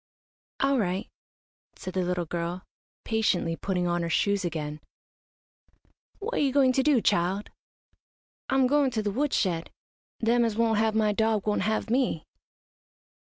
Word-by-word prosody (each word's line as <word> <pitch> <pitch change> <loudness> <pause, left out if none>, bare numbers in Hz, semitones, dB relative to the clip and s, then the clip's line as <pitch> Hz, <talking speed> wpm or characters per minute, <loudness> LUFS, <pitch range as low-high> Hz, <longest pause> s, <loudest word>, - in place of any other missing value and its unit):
"All 275 -1 +3
right," 190 +1 -1 0.7
said 185 - -7
the 185 - 0
little 180 -1 -1
girl, 170 +3 -4 0.4
patiently 210 -7 +1
putting 180 0 -2
on 175 0 0
her 170 - -2
shoes 200 +3 +1
again. 155 -3 -4 1.4
"What 460 +4 -2
you 275 -2 +2
going 265 -1 +4
to 265 - +2
do, 275 -3 +3
child?" 195 +1 0 1.0
"I'm 265 -1 +3
goin' 280 +1 +3
to 225 -4 -2
the 205 - -1
wood 285 +6 0
shed. 170 -4 0 0.5
Them 235 +1 +3
as 225 -2 0
won't 225 -2 +2
have 220 0 +1
my 215 -1 +3
dog 220 -1 +1
won't 210 -1 +1
have 220 +2 -1
me." 245 -10 0
210 Hz, 150 wpm, -27 LUFS, 180-245 Hz, 1.4 s, going